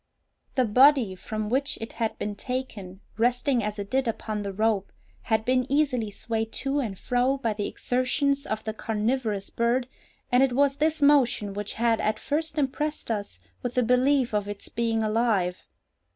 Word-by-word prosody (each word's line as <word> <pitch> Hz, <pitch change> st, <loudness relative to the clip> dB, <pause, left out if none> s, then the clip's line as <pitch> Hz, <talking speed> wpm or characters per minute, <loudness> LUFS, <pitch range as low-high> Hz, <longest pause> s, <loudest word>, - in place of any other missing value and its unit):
The 255 Hz, -2 st, +3 dB
body 250 Hz, -1 st, +5 dB
from 215 Hz, +3 st, -4 dB
which 270 Hz, +5 st, 0 dB
it 225 Hz, -, -6 dB
had 225 Hz, -2 st, -2 dB
been 210 Hz, -, -3 dB
taken, 205 Hz, -6 st, -5 dB, 0.2 s
resting 245 Hz, +1 st, +2 dB
as 210 Hz, +1 st, -3 dB
it 200 Hz, -1 st, -6 dB
did 265 Hz, -1 st, +1 dB
upon 215 Hz, -1 st, -3 dB
the 200 Hz, -1 st, -4 dB
rope, 210 Hz, 0 st, 0 dB, 0.4 s
had 220 Hz, -1 st, +2 dB
been 255 Hz, 0 st, +1 dB
easily 270 Hz, -7 st, +1 dB
swayed 225 Hz, +1 st, -3 dB
to 275 Hz, +1 st, -1 dB
and 215 Hz, -8 st, -3 dB
fro 250 Hz, +5 st, +1 dB
by 230 Hz, -5 st, -1 dB
the 205 Hz, -1 st, -3 dB
exertions 275 Hz, +3 st, 0 dB
of 215 Hz, 0 st, -3 dB
the 220 Hz, -, -3 dB
carnivorous 215 Hz, -1 st, -1 dB
bird, 240 Hz, +2 st, +1 dB, 0.4 s
and 250 Hz, +1 st, +5 dB
it 270 Hz, -2 st, +3 dB
was 280 Hz, +1 st, +2 dB
this 310 Hz, 0 st, +1 dB
motion 250 Hz, -8 st, +4 dB
which 205 Hz, 0 st, -4 dB
had 230 Hz, -1 st, +1 dB
at 215 Hz, 0 st, 0 dB
first 310 Hz, +5 st, -2 dB
impressed 295 Hz, -1 st, -1 dB
us 205 Hz, -2 st, -3 dB, 0.2 s
with 245 Hz, -1 st, -4 dB
the 250 Hz, -, +3 dB
belief 250 Hz, +1 st, +3 dB
of 205 Hz, -1 st, 0 dB
its 205 Hz, -1 st, -6 dB
being 225 Hz, -1 st, 0 dB
alive. 215 Hz, -5 st, 0 dB
235 Hz, 175 wpm, -26 LUFS, 215-265 Hz, 0.4 s, body